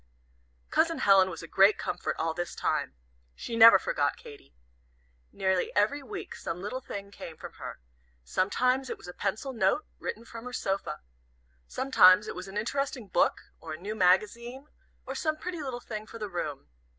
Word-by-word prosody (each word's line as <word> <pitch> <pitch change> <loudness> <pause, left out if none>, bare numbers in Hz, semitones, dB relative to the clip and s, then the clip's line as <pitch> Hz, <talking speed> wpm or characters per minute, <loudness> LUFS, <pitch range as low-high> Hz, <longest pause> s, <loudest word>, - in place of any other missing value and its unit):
Cousin 330 0 +2
Helen 195 -5 +5
was 165 -2 -7
a - - -8
great 195 +5 +5
comfort - - -3
all 160 0 -1
this 175 +1 -4
time. - - -1 0.4
She 235 - -5
never 230 -3 +10
forgot 145 -5 -1
Katy. 70 - -14 0.8
Nearly 190 -1 0
every 215 +8 +2
week 270 - -7
some 170 +1 -5
little 210 +7 -4
thing 200 -4 -7
came 165 -5 -9
from - - -9
her. - - -6 0.5
Sometimes 250 - +1
it - - -4
was - - -13
a 180 - -7
pencil 215 +9 -3
note, 220 +6 +1
written 230 +2 -5
from 230 +1 -9
her 250 - -7
sofa. 195 - -2 0.7
Sometimes 210 -7 +5
it - - -4
was 185 +1 -7
an 195 +2 -7
interesting 245 0 -2
book, - - +1
or 160 -1 -7
a - - -6
new 205 +4 -4
magazine, 220 +7 +1 0.4
or - - -4
some 310 -1 -1
pretty 345 0 -5
little 260 -4 -4
thing 215 -2 -7
for - - -9
the 210 -2 -5
room. 150 -5 -4
210 Hz, 175 wpm, -29 LUFS, 185-250 Hz, 0.8 s, never